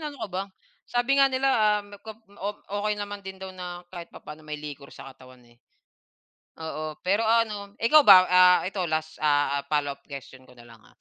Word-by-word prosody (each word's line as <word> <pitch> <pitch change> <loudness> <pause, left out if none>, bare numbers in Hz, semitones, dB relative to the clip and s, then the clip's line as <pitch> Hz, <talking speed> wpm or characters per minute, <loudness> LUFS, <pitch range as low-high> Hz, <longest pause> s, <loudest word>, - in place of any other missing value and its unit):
ano 300 -2 -6
ka - - -8
ba. 185 +1 -2 0.5
Sabi 245 +3 +1
nga 275 - +7
nila, 265 +1 +1
ah, 210 -3 +3
ma 205 0 -13
kop 220 +1 -11
ma 200 - -20
op 205 +1 -3
okay, 205 +1 -1
naman 205 0 -6
din 190 0 -8
daw 190 - -7
na 180 -1 -7
kahit 175 -2 -9
papano 150 +1 -12
may 150 0 -6
liquor 145 -2 -9
sa - - -11
katawan, 130 -1 -17
eh. 120 - -24 1.1
Oo, 155 -1 -6
pero 200 +5 +1
ano, 215 -3 0
ikaw 270 +7 +6
ba, 185 -2 +9
ah, 180 0 +6
ito 190 +1 -3
last, 155 0 -3
ah, 145 -2 +1
follow-up 145 -2 -2
question 135 -2 -11
ko 125 - -18
na 120 - -15
lang, 115 -2 -17
ah. - - -23
185 Hz, 205 wpm, -26 LUFS, 150-210 Hz, 1.1 s, ba